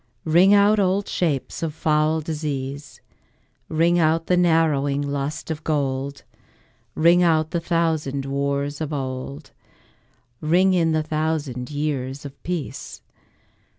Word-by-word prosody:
Ring 175 Hz, +5 st, +5 dB
out 205 Hz, +1 st, +5 dB
old 195 Hz, +1 st, +1 dB
shapes 150 Hz, -7 st, -2 dB
of 160 Hz, -2 st, -3 dB
foul 155 Hz, 0 st, +1 dB
disease, 145 Hz, -2 st, -5 dB, 0.7 s
Ring 170 Hz, +2 st, +2 dB
out 165 Hz, 0 st, +2 dB
the 180 Hz, -, +2 dB
narrowing 155 Hz, -5 st, +2 dB
lust 140 Hz, +2 st, -3 dB
of 155 Hz, -1 st, -5 dB
gold; 140 Hz, -2 st, -2 dB, 0.7 s
Ring 170 Hz, +2 st, +5 dB
out 160 Hz, -2 st, +2 dB
the 170 Hz, -, 0 dB
thousand 160 Hz, -5 st, -1 dB
wars 140 Hz, +1 st, -2 dB
of 155 Hz, -1 st, -3 dB
old, 135 Hz, +1 st, -5 dB, 0.9 s
Ring 180 Hz, +5 st, +3 dB
in 165 Hz, -3 st, +2 dB
the 155 Hz, -1 st, +1 dB
thousand 155 Hz, -5 st, -2 dB
years 145 Hz, -2 st, -3 dB
of 140 Hz, -, -10 dB
peace. 170 Hz, -6 st, -5 dB
155 Hz, 120 wpm, -23 LUFS, 140-165 Hz, 0.9 s, Ring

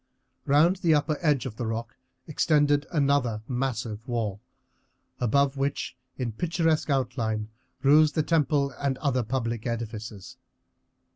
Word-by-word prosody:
Round 155 Hz, +7 st, +4 dB
the 165 Hz, -3 st, +3 dB
upper 150 Hz, 0 st, 0 dB
edge 150 Hz, -6 st, +2 dB
of 115 Hz, -4 st, -6 dB
the 120 Hz, -, -3 dB
rock 115 Hz, +1 st, -4 dB, 0.3 s
extended 145 Hz, -2 st, +2 dB
another 140 Hz, -8 st, +1 dB
massive 120 Hz, -3 st, -3 dB
wall, 110 Hz, -5 st, -2 dB, 0.8 s
above 140 Hz, +3 st, +2 dB
which 140 Hz, +1 st, -2 dB, 0.2 s
in 125 Hz, -3 st, -2 dB
picturesque 165 Hz, -, 0 dB
outline 115 Hz, -5 st, -1 dB, 0.3 s
rose 150 Hz, +2 st, +6 dB
the 155 Hz, -, +1 dB
temple 145 Hz, -4 st, +1 dB
and 140 Hz, -2 st, 0 dB
other 135 Hz, -4 st, 0 dB
public 115 Hz, -1 st, -2 dB
edifices. 110 Hz, -4 st, -6 dB
135 Hz, 125 wpm, -27 LUFS, 115-145 Hz, 0.8 s, rose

